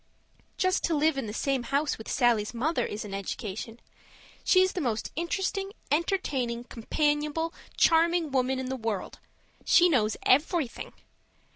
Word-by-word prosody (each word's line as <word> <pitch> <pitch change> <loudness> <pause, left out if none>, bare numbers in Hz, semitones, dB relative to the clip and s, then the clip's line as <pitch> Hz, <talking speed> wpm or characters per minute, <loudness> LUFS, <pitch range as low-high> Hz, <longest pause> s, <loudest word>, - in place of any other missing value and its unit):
Just 370 0 +1
to 335 - +1
live 305 +1 +2
in 270 -5 -3
the - - -4
same 270 +4 0
house 280 +3 -1
with 220 - -8
Sallie's 240 -3 +2
mother 305 +8 0
is 210 +1 -5
an 200 - -7
education. 210 +3 -5 0.6
She's 370 0 +4
the 360 - -2
most 230 -6 -2
interesting, 385 +3 -2 0.2
entertaining, 280 -8 0
companionable, 295 +6 -1 0.2
charming 335 -1 +3
woman 260 0 +1
in 260 - -3
the 265 - -2
world; 225 -5 -4 0.4
she 355 0 +5
knows 220 -8 +2
everything. 295 -1 +1
275 Hz, 140 wpm, -28 LUFS, 235-330 Hz, 0.6 s, she